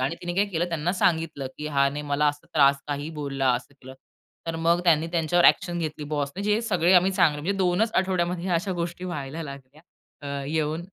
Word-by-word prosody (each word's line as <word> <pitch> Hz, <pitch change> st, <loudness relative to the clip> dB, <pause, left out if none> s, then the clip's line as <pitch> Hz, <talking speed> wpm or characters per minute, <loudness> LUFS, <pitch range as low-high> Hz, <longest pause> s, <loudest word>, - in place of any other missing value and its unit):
आणि 135 Hz, +6 st, 0 dB
तिने 175 Hz, 0 st, -3 dB
काय 200 Hz, +2 st, +2 dB
केलं, 175 Hz, -3 st, -2 dB
त्यांना 165 Hz, +1 st, -1 dB
सांगितलं 165 Hz, -6 st, 0 dB
की 150 Hz, -, -4 dB
"ह्याने 140 Hz, 0 st, +1 dB
मला 150 Hz, +1 st, +2 dB
असा 145 Hz, 0 st, -5 dB
त्रास 140 Hz, -2 st, +5 dB
काहीही 145 Hz, +2 st, -3 dB
बोलला, 135 Hz, -2 st, 0 dB
असं 140 Hz, +3 st, -6 dB
केलं." 130 Hz, 0 st, -11 dB, 0.5 s
तर 165 Hz, 0 st, -2 dB
मग 170 Hz, +1 st, +2 dB
त्यांनी 165 Hz, -1 st, +4 dB
त्यांच्यावर 170 Hz, +1 st, +2 dB
ॲक्शन 175 Hz, -2 st, +3 dB
घेतली 155 Hz, -2 st, -4 dB
बॉसने, 145 Hz, +5 st, -2 dB
जे 210 Hz, +2 st, +1 dB
सगळे 180 Hz, -5 st, +2 dB
आम्ही 180 Hz, +1 st, +5 dB
चांगले 150 Hz, -5 st, +2 dB
म्हणजे 195 Hz, +6 st, -1 dB
2 185 Hz, +3 st, +2 dB
च 225 Hz, -, -11 dB
आठवड्यामध्ये 180 Hz, -1 st, 0 dB
अशा 175 Hz, +3 st, 0 dB
गोष्टी 175 Hz, +1 st, -4 dB
व्हायला 160 Hz, -2 st, -5 dB
लागल्या, 140 Hz, 0 st, -10 dB, 0.4 s
अ, 140 Hz, -1 st, -4 dB
येऊन. 155 Hz, +2 st, -1 dB
165 Hz, 195 wpm, -25 LUFS, 145-175 Hz, 0.5 s, त्रास